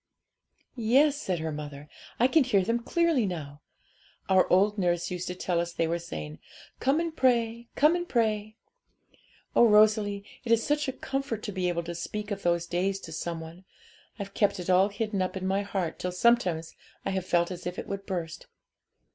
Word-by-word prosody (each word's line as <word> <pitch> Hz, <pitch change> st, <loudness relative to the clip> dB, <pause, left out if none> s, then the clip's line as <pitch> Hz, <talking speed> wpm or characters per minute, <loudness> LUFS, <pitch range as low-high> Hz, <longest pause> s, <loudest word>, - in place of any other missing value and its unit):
'Yes,' 275 Hz, +5 st, +3 dB
said 185 Hz, -2 st, -1 dB
her 160 Hz, 0 st, -3 dB
mother, 150 Hz, -1 st, -7 dB, 0.3 s
'I 245 Hz, -, +5 dB
can 315 Hz, +1 st, +5 dB
hear 205 Hz, -7 st, +2 dB
them 230 Hz, +5 st, 0 dB
clearly 325 Hz, -, +2 dB
now; 150 Hz, -5 st, -6 dB, 0.7 s
our 190 Hz, -1 st, +4 dB
old 205 Hz, +3 st, +4 dB
nurse 175 Hz, -2 st, 0 dB
used 180 Hz, 0 st, -4 dB
to 180 Hz, -, -4 dB
tell 180 Hz, -1 st, -1 dB
us 170 Hz, 0 st, -2 dB
they 165 Hz, -, 0 dB
were 170 Hz, +1 st, -1 dB
saying, 75 Hz, -, -7 dB, 0.4 s
"Come 275 Hz, +4 st, +2 dB
and 335 Hz, -1 st, -2 dB
pray, 235 Hz, -3 st, +1 dB
come 300 Hz, +4 st, +5 dB
and 350 Hz, 0 st, -3 dB
pray." 215 Hz, -2 st, 0 dB, 1.0 s
Oh, 235 Hz, -, +7 dB
Rosalie, 210 Hz, -1 st, +4 dB, 0.2 s
it 235 Hz, -, -3 dB
is 230 Hz, -1 st, +4 dB
such 295 Hz, 0 st, +1 dB
a -, -, 0 dB
comfort 270 Hz, -4 st, -4 dB
to 210 Hz, -, -4 dB
be 185 Hz, -2 st, -1 dB
able 170 Hz, -1 st, -1 dB
to 170 Hz, +1 st, -5 dB
speak 210 Hz, +5 st, -5 dB
of 200 Hz, -1 st, -3 dB
those 170 Hz, -1 st, +1 dB
days 185 Hz, +3 st, -1 dB
to 160 Hz, -, -9 dB
some 165 Hz, +1 st, -4 dB
one! 165 Hz, +3 st, -11 dB, 0.5 s
I've 200 Hz, -2 st, -6 dB
kept 205 Hz, -2 st, +1 dB
it 180 Hz, +1 st, -1 dB
all 190 Hz, +2 st, +5 dB
hidden 205 Hz, -1 st, -2 dB
up 185 Hz, +1 st, -2 dB
in 185 Hz, -, -4 dB
my 195 Hz, +1 st, +1 dB
heart 195 Hz, -4 st, -3 dB
till 180 Hz, -, -2 dB
sometimes 180 Hz, -5 st, +2 dB, 0.3 s
I -, -, 0 dB
have 190 Hz, -1 st, -2 dB
felt 170 Hz, +1 st, +2 dB
as 180 Hz, -1 st, -6 dB
if 180 Hz, -, -5 dB
it -, -, -5 dB
would 195 Hz, 0 st, -6 dB
burst.' 170 Hz, -3 st, -4 dB
195 Hz, 195 wpm, -28 LUFS, 175-230 Hz, 1.0 s, Oh